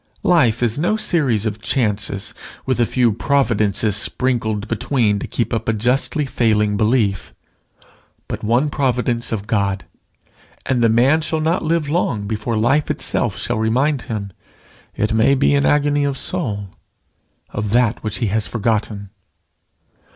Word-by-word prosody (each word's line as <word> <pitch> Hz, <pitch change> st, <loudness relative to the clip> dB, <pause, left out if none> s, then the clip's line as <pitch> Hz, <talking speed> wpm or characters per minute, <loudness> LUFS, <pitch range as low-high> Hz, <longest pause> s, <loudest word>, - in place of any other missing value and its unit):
Life 125 Hz, -10 st, +3 dB
is 120 Hz, +3 st, 0 dB
no 195 Hz, +7 st, +1 dB
series 135 Hz, -, +1 dB
of 110 Hz, 0 st, -3 dB
chances 105 Hz, -5 st, -2 dB, 0.3 s
with 130 Hz, -2 st, 0 dB
a 120 Hz, -, +3 dB
few 125 Hz, -3 st, +2 dB
providences 110 Hz, -6 st, +1 dB
sprinkled 110 Hz, -1 st, -1 dB
between 110 Hz, -2 st, 0 dB
to -, -, -5 dB
keep 120 Hz, -, -2 dB
up 115 Hz, 0 st, -1 dB
a -, -, +2 dB
justly 125 Hz, +7 st, 0 dB
failing 105 Hz, -5 st, +1 dB
belief, 100 Hz, -, 0 dB, 0.9 s
but -, -, -5 dB
one 120 Hz, +7 st, +1 dB
providence 125 Hz, -4 st, -1 dB
of 105 Hz, -3 st, -3 dB
God; 100 Hz, -3 st, -1 dB, 0.8 s
and 130 Hz, -2 st, +1 dB
the 115 Hz, -, +5 dB
man 130 Hz, +8 st, +4 dB
shall 160 Hz, 0 st, -2 dB
not 160 Hz, +4 st, 0 dB
live 165 Hz, -1 st, 0 dB
long 135 Hz, -, -1 dB
before 110 Hz, +2 st, -2 dB
life 130 Hz, +7 st, +2 dB
itself -, -, -1 dB
shall 120 Hz, -2 st, -2 dB
remind 130 Hz, +6 st, +1 dB
him, 100 Hz, -4 st, -4 dB, 0.6 s
it 105 Hz, +1 st, 0 dB
may 115 Hz, +5 st, +4 dB
be 140 Hz, +1 st, +2 dB
in 140 Hz, 0 st, +3 dB
agony 145 Hz, 0 st, +2 dB
of 140 Hz, -1 st, -1 dB
soul, 105 Hz, -, -3 dB, 0.8 s
of 105 Hz, 0 st, -3 dB
that 115 Hz, 0 st, +1 dB
which 110 Hz, -1 st, -2 dB
he 120 Hz, -, -1 dB
has 105 Hz, +1 st, -1 dB
forgotten. 105 Hz, -3 st, -2 dB
115 Hz, 150 wpm, -19 LUFS, 105-135 Hz, 0.9 s, the